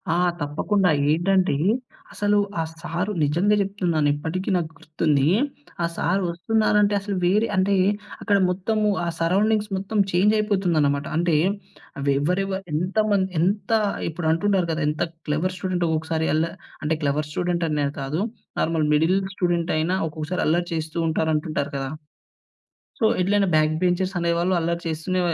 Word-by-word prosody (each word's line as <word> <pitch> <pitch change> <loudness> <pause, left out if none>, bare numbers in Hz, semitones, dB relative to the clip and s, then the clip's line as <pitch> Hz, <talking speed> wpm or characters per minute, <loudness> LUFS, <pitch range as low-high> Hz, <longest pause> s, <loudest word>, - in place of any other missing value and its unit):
ఆ! - - +1 0.2
తప్పకుండా 180 +6 +1 0.2
ఏంటంటే 185 0 +2 0.6
అసలు 205 0 +1 0.2
ఆ - - +2 0.2
సారు 175 +4 -2
నిజంగా 175 +9 +2
జెప్తున్నాను 180 -6 0
ఇప్పటికి 160 +6 -3
నాకు 165 -3 -1
గుర్తుంది. 155 -3 0 0.6
ఆ - - +3
సారు 190 +3 0
ఒస్తున్నారంటే 210 +3 +2
అసలు 200 0 -4
వేరే 210 +6 +3
అంటే 190 +1 +2 0.5
అక్కడ 205 -2 +2
మొత్తము 210 +4 0 0.2
ఆ - - -2
సరౌండింగ్స్ 210 +5 +2
మొత్తం 195 +3 -3
చేంజ్ 195 +5 +3
అయిపోతుందన్నమాట. 170 -9 +1
అంటే 170 -1 +2 0.6
అవి 140 0 +1
ఎవరెవరు 190 +5 -1
ఎంతమంది 195 +3 +1
ఎంత 200 +7 0 0.4
ఇప్పుడు 160 0 -3
అంటుంటారు 190 +1 +1
గదా! 160 +1 -2
ఎంత 150 - -1 0.2
క్లెవర్ 165 +5 -1
స్టూడెంట్ 185 -1 -2
ఒకొక్కసారి 160 0 -1
అల్ల 160 +1 +2 0.4
అంటే 155 +1 0
క్లెవర్ 145 +1 0
స్టూడెంట్ 175 +1 -1
అనే 150 -1 0
కాదు. 140 +6 -2 0.4
నార్మల్ 160 -2 +1
మిడిల్ 160 +5 +3 0.2
స్టూడెంట్ 175 -3 0
అయినా 170 +4 +1
ఒక్కొక్కసారి 155 +3 -3
అల్లరి 175 +3 +1
చేస్తూంటారు 160 0 -1
అంటుంటారు 150 -1 -2
కదా! 135 -1 -3 1.1
సో, 225 - +2 0.2
ఎట్లైనా 200 +2 +2
బ్యాక్ 155 0 +3
బెంచర్స్ 185 +1 +1
అనేవాళ్ళు 170 +2 +1
అల్లరి 170 +1 -1
చేస్తూనే 165 +4 -2
175 Hz, 135 wpm, -23 LUFS, 160-195 Hz, 1.1 s, ఆ